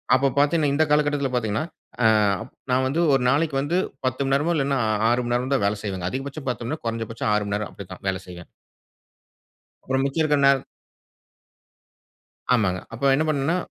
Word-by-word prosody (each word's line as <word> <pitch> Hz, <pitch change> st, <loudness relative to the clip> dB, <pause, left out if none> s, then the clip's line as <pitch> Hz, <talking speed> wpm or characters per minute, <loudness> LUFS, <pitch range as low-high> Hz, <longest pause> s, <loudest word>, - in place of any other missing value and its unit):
அப்போ 135 Hz, +2 st, +3 dB
பாத்தீங்கன்னா 145 Hz, +1 st, +3 dB
இந்த 150 Hz, +3 st, +3 dB
காலகட்டத்தில 145 Hz, -2 st, +1 dB
பாத்தீங்கன்னா. 110 Hz, +4 st, -1 dB, 0.4 s
அ, -, -, +4 dB, 0.7 s
நான் 130 Hz, +1 st, +2 dB
வந்து 140 Hz, +5 st, -1 dB
1 135 Hz, -, +3 dB
நாளைக்கு 145 Hz, +2 st, +1 dB
வந்து 155 Hz, +6 st, 0 dB, 0.3 s
10 130 Hz, +1 st, -1 dB
மணி 135 Hz, 0 st, 0 dB
நேரமோ 155 Hz, +5 st, +1 dB
இல்லைன்னா 140 Hz, -2 st, 0 dB, 0.3 s
6 120 Hz, +1 st, +2 dB
மணி 120 Hz, -, -1 dB
நேரமோ 125 Hz, +2 st, -2 dB
தான் 115 Hz, -, +1 dB
வேலை 105 Hz, +1 st, -1 dB
செய்வேன். 95 Hz, -4 st, -3 dB
அதிகபட்சம் 135 Hz, +4 st, -6 dB
10 120 Hz, -, -3 dB
மணி 120 Hz, -, -3 dB
நேரம் 155 Hz, -, -8 dB
கொறஞ்ச 115 Hz, 0 st, -2 dB
பட்சம் 115 Hz, -1 st, -2 dB
6 105 Hz, 0 st, +1 dB
மணி 100 Hz, -, -1 dB
நேரம். 105 Hz, 0 st, -3 dB
அப்புடி 100 Hz, -, -10 dB
தான். -, -, -13 dB
வேலை 95 Hz, -1 st, -2 dB
செய்வேன். 90 Hz, -1 st, -11 dB, 1.4 s
அப்பறம் 130 Hz, +1 st, 0 dB
மிச்சம் 140 Hz, +4 st, 0 dB
இருக்குற 150 Hz, -2 st, +2 dB
நேர 140 Hz, 0 st, +5 dB, 2.0 s
ஆமாங்க. 95 Hz, -6 st, +1 dB
அப்போ 125 Hz, +4 st, -2 dB
என்ன 150 Hz, +3 st, +1 dB
பண்னோம்னா, 155 Hz, +3 st, +1 dB
135 Hz, 185 wpm, -23 LUFS, 115-145 Hz, 2.0 s, நேர